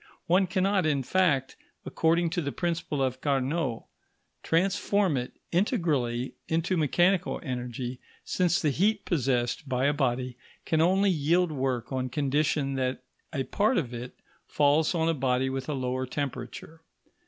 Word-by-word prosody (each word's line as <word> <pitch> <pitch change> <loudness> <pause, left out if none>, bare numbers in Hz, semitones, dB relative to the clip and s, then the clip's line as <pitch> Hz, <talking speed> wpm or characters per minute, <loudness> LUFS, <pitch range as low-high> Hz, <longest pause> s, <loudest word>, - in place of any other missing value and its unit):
One 185 +2 +3
cannot, 190 -1 +1
in 140 -3 +1
fact, 145 -5 +1 0.3
according 165 +1 +1
to 175 0 -1
the 140 -2 -3
principle 165 -5 -2
of 130 0 -2
Carnot, 135 -2 0 0.6
transform 190 +1 +1
it 125 -1 -3 0.2
integrally 150 - 0
into 165 +3 0
mechanical 175 +4 +2
energy, 125 -2 -4 0.3
since 175 -2 +1
the 150 - +1
heat 205 +7 +1
possessed 130 -3 0
by 130 0 +1
a 145 - +3
body 125 -3 -1 0.3
can 160 -1 +2
only 190 +4 +4
yield 170 +2 +2
work 130 -4 -2
on 130 -1 -2
condition 140 +1 0
that 130 0 -2 0.3
a 135 -3 -1
part 215 - +1
of 125 -8 -1
it 120 +1 -7 0.3
falls 150 +4 +2
on 165 -1 +1
a 165 - +3
body 130 -2 0
with 135 +2 -4
a 150 - -1
lower 130 0 -2
temperature. 140 +3 -5
145 Hz, 145 wpm, -28 LUFS, 130-175 Hz, 0.6 s, only